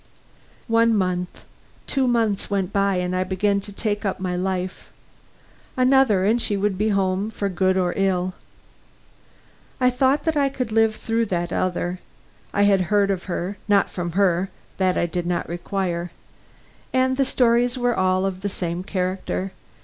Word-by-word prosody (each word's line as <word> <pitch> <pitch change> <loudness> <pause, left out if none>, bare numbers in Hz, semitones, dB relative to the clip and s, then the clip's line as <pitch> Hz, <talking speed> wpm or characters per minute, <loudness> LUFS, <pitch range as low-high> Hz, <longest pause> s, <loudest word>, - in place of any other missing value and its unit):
One 230 -1 +3
month, 180 -2 -2 0.4
two 270 -2 0
months 225 -5 +1
went 195 -1 -1
by, 200 -1 +2
and 180 0 -1
I 185 - +1
began 200 +2 0
to 205 - -8
take 205 0 -2
up 195 -3 -2
my 185 -1 -2
life. 185 0 -3 0.9
Another, 255 -7 +4
and 230 +4 +3
she 205 - +1
would 200 0 0
be 210 +3 0
home 195 0 0
for 200 -2 -3
good 185 +1 +1
or 180 -1 +1
ill. 185 -2 0 1.5
I 250 -1 +4
thought 265 +3 +2
that 320 -1 0
I 280 -2 +3
could 255 -4 -4
live 225 0 +3
through 225 +1 -1
that 175 -2 -2
other. 180 0 -1 0.5
I 205 - +2
had 200 -2 +4
heard 205 -1 +3
of 185 -2 -3
her; 185 +2 -3
not 200 -1 +3
from 175 -2 -4
her 190 -1 +2 0.3
that 185 -1 +2
I - - +2
did 175 +1 -3
not 175 -1 -1
require; 175 0 -3 0.8
and 260 0 +2
the 275 - +2
stories 245 -1 +2
were 245 -1 +1
all 185 0 +2
of 190 -1 -3
the 200 - -2
same 175 -2 -3
character. 185 0 -2
195 Hz, 165 wpm, -23 LUFS, 185-225 Hz, 1.5 s, Another